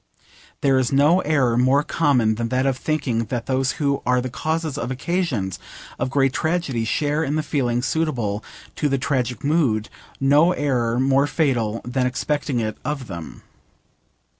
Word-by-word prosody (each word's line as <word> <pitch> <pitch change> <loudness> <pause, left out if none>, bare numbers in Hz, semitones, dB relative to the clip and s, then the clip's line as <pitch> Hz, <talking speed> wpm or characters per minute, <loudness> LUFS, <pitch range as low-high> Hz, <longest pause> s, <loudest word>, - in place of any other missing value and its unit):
There 135 -2 +3
is 125 -2 0
no 145 +6 +4
error 140 -8 +2
more 135 +3 +3
common 130 -9 +2
than 115 +1 -3
that 130 +2 +1
of 135 -1 +2
thinking 125 -5 -1
that 120 +1 -4
those 130 0 0
who 140 -2 0
are 125 0 +2
the 125 0 -4
causes 160 +1 -2
or 140 -3 -3
occasions 130 - -2 0.4
of - - -1
great 135 -1 +2
tragedies 160 -9 -1
share 150 +5 0
in 145 0 -1
the 155 - 0
feelings 125 -5 0
suitable 120 -11 -1 0.3
to 150 - +1
the 135 - +1
tragic 130 -1 -1
mood: 140 -8 +1 0.3
no 145 +6 +4
error 125 -6 0
more 135 +2 +3
fatal 120 -8 0
than 125 +1 0
expecting 140 +1 -1
it 110 -2 -3
of 150 -3 -3
them. 85 -7 -8
135 Hz, 165 wpm, -22 LUFS, 120-150 Hz, 0.4 s, no